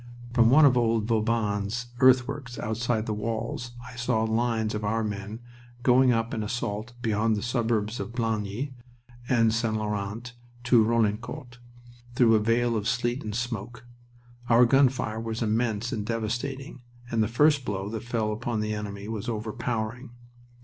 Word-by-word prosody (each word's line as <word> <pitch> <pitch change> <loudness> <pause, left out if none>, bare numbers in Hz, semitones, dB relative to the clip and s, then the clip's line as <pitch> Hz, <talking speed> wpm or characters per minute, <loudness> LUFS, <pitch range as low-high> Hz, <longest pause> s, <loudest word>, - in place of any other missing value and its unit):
From 115 -2 +5
one 150 +4 +7
of 130 -3 +5
old 115 -3 +2
Vauban's 110 +1 -1
earthworks 130 0 +3
outside 110 0 -1
the 110 - -2
walls 115 +2 -4
I 125 - -10
saw 120 -2 0
lines 110 -1 0
of 105 0 -3
our 110 +2 0
men 105 +2 -5 0.4
going 125 0 +5
up 115 0 0
in 110 - -2
assault 110 0 -3
beyond 110 0 +1
the 105 - -3
suburbs 115 -2 0
of 100 +2 -4
Blangy 115 +2 -2 0.6
and 115 -3 +3
St. 115 -1 0
Laurent 105 +3 -4 0.3
to 120 -2 +5
Roclincourt, 115 +4 -1 0.6
through 120 -2 +5
a 110 - +5
veil 115 +2 +1
of 105 -1 -1
sleet 120 +2 0
and 105 -1 -4
smoke. 115 0 -4 0.6
Our 120 +1 +7
gun 135 +2 +5
fire 110 -4 -4
was 115 +1 -3
immense 115 +1 0
and 110 -4 -2
devastating, 120 +5 -3 0.3
and 115 -1 +1
the 110 - +2
first 145 +4 +3
blow 100 -4 -3
that 110 0 -4
fell 115 -3 -1
upon 115 +1 -2
the 110 0 -2
enemy 100 -1 -5
was 110 +1 -4
overpowering. 115 +2 -3
115 Hz, 155 wpm, -27 LUFS, 110-120 Hz, 0.6 s, one